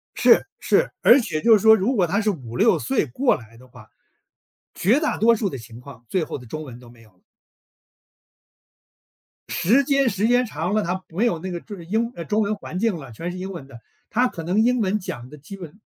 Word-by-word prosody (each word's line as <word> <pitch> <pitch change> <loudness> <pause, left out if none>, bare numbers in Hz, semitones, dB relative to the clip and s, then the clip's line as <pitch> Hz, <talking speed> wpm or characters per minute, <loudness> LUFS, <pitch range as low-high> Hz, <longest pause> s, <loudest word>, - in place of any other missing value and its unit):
是 - - +4
是， - - +1
而 260 - +7
且 160 -10 -3
就 230 - +4
是 220 - +7
说 220 +2 +7
如 220 +6 0
果 190 -7 +2
他 200 +5 0
是 215 -1 +1
5-6 165 - +1
岁 265 - 0
过 245 - +1
来 115 -1 -15
的 130 +2 -17
话， 110 -3 -16 0.8
绝 225 - +2
大 310 - -1
多 230 +2 +5
数 210 -2 -1
的 135 - -6
情 115 0 -12
况， 125 -3 -13
最 175 - 0
后 - - -6
的 125 - -13
中 155 +7 -6
文 125 -4 -10
都 120 -1 -15
没 120 -1 -18
有 110 - -21
了。 90 - -35 2.3
时 230 +11 +2
间 275 -1 +2
时 205 0 0
间 245 +1 +3
长 175 0 -3
了， 215 - +2
他 185 +1 -3
没 185 +8 -1
有 175 -8 +1
那 185 +3 -6
个 175 -1 -5
就 205 +2 -10
是 170 - -11
英 225 +7 -1
呃， 170 - -7
中 215 +1 0
文 210 +1 0
环 185 - -7
境 220 -2 0
了， 135 -7 -10
全 165 +10 -5
是 180 - -8
英 190 +1 -5
文 170 -8 -8
的。 130 -4 -13 0.3
他 250 +3 +2
可 165 - -8
能 180 +6 0
英 250 +1 +2
文 210 0 0
讲 125 -10 -7
得 150 +3 -13
基 150 +8 -10
本 180 +1 -11
185 Hz, 250 characters per minute, -22 LUFS, 140-220 Hz, 2.3 s, 而